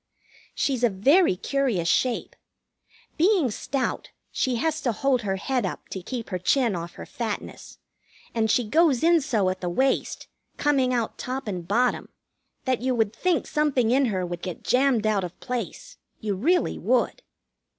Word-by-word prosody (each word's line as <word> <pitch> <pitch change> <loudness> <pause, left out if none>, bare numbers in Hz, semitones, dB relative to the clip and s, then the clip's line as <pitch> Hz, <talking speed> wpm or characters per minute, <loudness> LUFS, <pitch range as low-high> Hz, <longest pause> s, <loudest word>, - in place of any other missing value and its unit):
She's 260 -4 0
a 240 - +5
very 265 - +4
curious 235 -5 -1
shape. 245 +7 0 0.8
Being 345 - +3
stout, 265 +5 -3 0.2
she 255 -2 0
has 315 +6 -1
to 250 - +1
hold 255 +3 +1
her 195 -3 -1
head 250 +5 -1
up 185 - -5
to 190 - -5
keep 235 +4 -6
her 185 - -2
chin 235 +3 +2
off 170 0 -6
her - - -8
fatness; 225 -4 -6 0.6
and 220 -1 +1
she 235 +1 +2
goes 305 +1 +3
in 335 0 +5
so 225 -9 +1
at 185 - -7
the 180 - -2
waist, 260 +9 0 0.3
coming 275 -3 +2
out 235 -3 -2
top 255 -1 -4
and 180 -4 -4
bottom, 245 +6 +1 0.6
that 255 -3 0
you 255 0 0
would 220 -2 0
think 365 -2 +1
something 275 -6 +1
in 270 +2 +4
her 190 -6 -1
would 175 0 -5
get 180 -3 -6
jammed 250 -3 +2
out 210 -3 +2
of 180 0 -7
place. 250 - -5 0.2
You 210 -2 -2
really 320 - +1
would. - - +1
245 Hz, 170 wpm, -25 LUFS, 205-275 Hz, 0.8 s, a